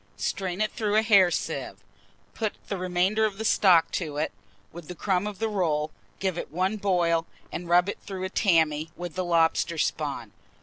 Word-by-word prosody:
Strain 190 -1 -2
it 215 - +1
through 210 -2 -1
a 220 - +4
hair 200 -5 +6
sieve, - - -3 0.6
put 215 -2 -2 0.2
the 200 - -1
remainder 185 +4 +1
of 210 -2 0
the 220 - -4
stock 180 -6 +4
to 155 -5 -3
it, 150 - -1 0.4
with 170 -2 -10
the 180 - -7
crumb 185 +4 0
of 210 -2 -6
the 225 - -1
rolls; 155 -7 0 0.3
give 190 -3 -2
it - - -6
one 185 +6 0
boil, 175 -5 +1 0.2
and 175 -1 -6
rub 175 +1 +5
it 200 - -4
through 190 -2 -6
a 190 - -2
tammy, 160 -6 +2
with 175 -2 -6
the 185 - -2
lobster 170 -1 +2
spawn. - - -2
180 Hz, 190 wpm, -26 LUFS, 170-200 Hz, 0.6 s, hair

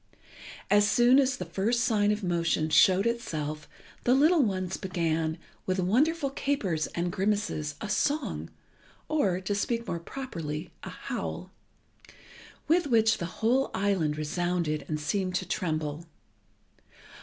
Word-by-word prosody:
As 205 0 +5
soon 245 +4 +5
as 265 -2 +2
the - - -5
first 230 +5 0
sign 210 -3 +2
of 210 0 -2
motion 170 -3 0
showed 190 +5 +5
itself 155 -10 -3 0.3
the 250 - +4
little 310 +4 +5
ones 190 -5 -1
began, 165 -3 -1 0.3
with 185 0 0
wonderful 275 - +2
capers 210 - -1
and 175 +1 -1
grimaces, 190 -7 -1
a 215 - -3
song, 290 +8 -1 0.6
or, 200 - +1
to 190 +2 -2
speak 230 +3 -1
more 170 - -3
properly, 165 - -6
a - - -7
howl, - - -5 1.2
with 330 0 +3
which 225 -3 +3
the 170 - -3 0.2
whole 260 +4 +3
island 190 -7 0
resounded 165 0 -1
and 155 -1 -2
seemed 185 +4 -1
to 185 -1 -1
tremble. 155 -3 -2
190 Hz, 130 wpm, -28 LUFS, 165-235 Hz, 1.2 s, As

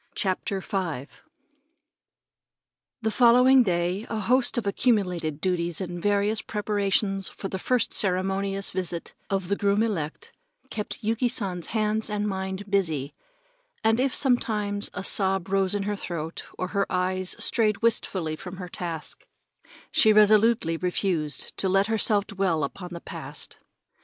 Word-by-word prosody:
CHAPTER 190 0 -1
V 170 -10 -3 2.0
The 220 - +1
following 250 +3 +6
day 180 0 0
a 225 - -2
host 250 +5 +2
of 235 - -1
accumulated 185 - 0
duties 175 -1 0
and 175 -2 -5
various 205 +2 +1
preparations 200 -2 0
for 195 - -7
the 190 - -4
first 250 +5 +1
ceremonious 195 +1 +1
visit 175 -2 -4 0.2
of 195 -2 -1
the 200 - +1
groom 200 +2 +2
elect 165 -9 -3 0.4
kept 210 0 -4
Yuki 225 +3 +1
San's 185 -7 -1
hands 215 0 0
and 210 0 -1
mind 190 0 -4
busy, 160 -8 0 0.7
and 225 +1 +3
if 265 0 +1
sometimes 210 -6 +1
a - - -4
sob 190 -1 +1
rose 195 0 +1
in 200 - -1
her 205 +1 -2
throat, 165 -4 -5
or 185 - -3
her 200 0 -1
eyes 185 0 0
strayed 215 -2 +1
wistfully 185 -8 0
from 180 +3 -9
her 180 -1 -6
task, 165 -3 -6 0.6
she 220 - +5
resolutely 215 -4 +4
refused 175 -5 -1
to 190 - +1
let 195 +1 +3
herself 215 -2 +2
dwell 190 -7 0
upon 180 +6 -5
the 170 -1 -7
past. - - -8
195 Hz, 140 wpm, -26 LUFS, 180-215 Hz, 2.0 s, following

